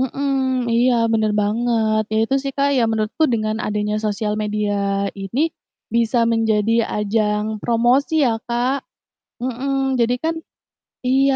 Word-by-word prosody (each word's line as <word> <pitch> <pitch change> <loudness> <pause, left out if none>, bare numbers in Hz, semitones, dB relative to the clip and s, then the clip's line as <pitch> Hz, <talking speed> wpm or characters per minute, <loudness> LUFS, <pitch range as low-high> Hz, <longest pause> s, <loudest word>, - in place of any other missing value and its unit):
mhm, 260 - +1
mhm, 265 -2 0
iya, 245 +2 +3 0.2
bener 215 -1 +2
banget, 220 0 +1
ya 220 - +1
itu 270 - -1
sih, 275 -1 -3
Kak, 280 0 +2
ya 245 - +3
menurutku 220 +7 -1
dengan 215 -2 0
adanya 210 0 -1
sosial 210 0 -1
media 210 0 -1 0.4
ini, 195 +6 -4 0.5
bisa 235 +1 +2
menjadi 225 -1 +1 0.2
ajang 210 0 0 0.2
promosi 245 +6 +2
ya, 240 - +2 0.2
Kak. 250 +3 0 0.6
Heeh, 255 +3 -2 0.3
jadi 235 +1 +3
kan 330 0 +1 0.7
iya, 270 +1 +3
230 Hz, 135 wpm, -20 LUFS, 215-260 Hz, 0.7 s, iya